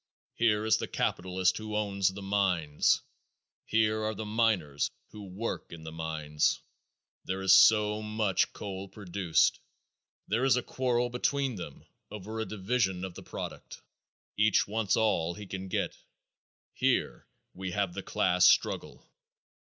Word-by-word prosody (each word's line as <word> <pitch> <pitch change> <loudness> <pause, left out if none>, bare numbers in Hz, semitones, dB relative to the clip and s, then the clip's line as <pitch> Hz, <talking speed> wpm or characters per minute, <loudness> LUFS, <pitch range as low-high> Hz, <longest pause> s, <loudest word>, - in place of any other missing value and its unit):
Here 110 -2 +2
is 110 - +4
the - - -4
capitalist 95 0 0
who 110 0 -5
owns 100 -3 +1
the 100 +1 -8
mines; 90 -7 +1 0.6
here 110 0 +2
are 110 0 -2
the 110 - -5
miners 105 -10 +1 0.2
who 105 -2 -9
work 100 +5 -5
in 85 -2 -9
the 80 - -7
mines. 80 -2 -1 0.7
There 95 +1 -3
is 95 0 +6
so 105 +1 +6
much 105 -2 0
coal 100 -1 -6
produced. 95 -4 +1 0.7
There 115 +5 0
is 135 -1 +4
a 125 - -1
quarrel 125 -2 0
between 135 +2 0
them 80 -6 -9 0.2
over 105 +2 -6
a 110 - -1
division 100 -3 -1
of 95 - -7
the - - -10
product. - - -8 0.5
Each 110 0 +3
wants 105 -1 0
all 85 -6 +1
he 105 - -8
can 95 0 -6
get. - - -2 0.8
Here - - 0 0.3
we 95 0 -5
have 95 -1 -1
the - - -4
class 90 0 +3
struggle. - - +1
100 Hz, 145 wpm, -30 LUFS, 90-110 Hz, 0.8 s, is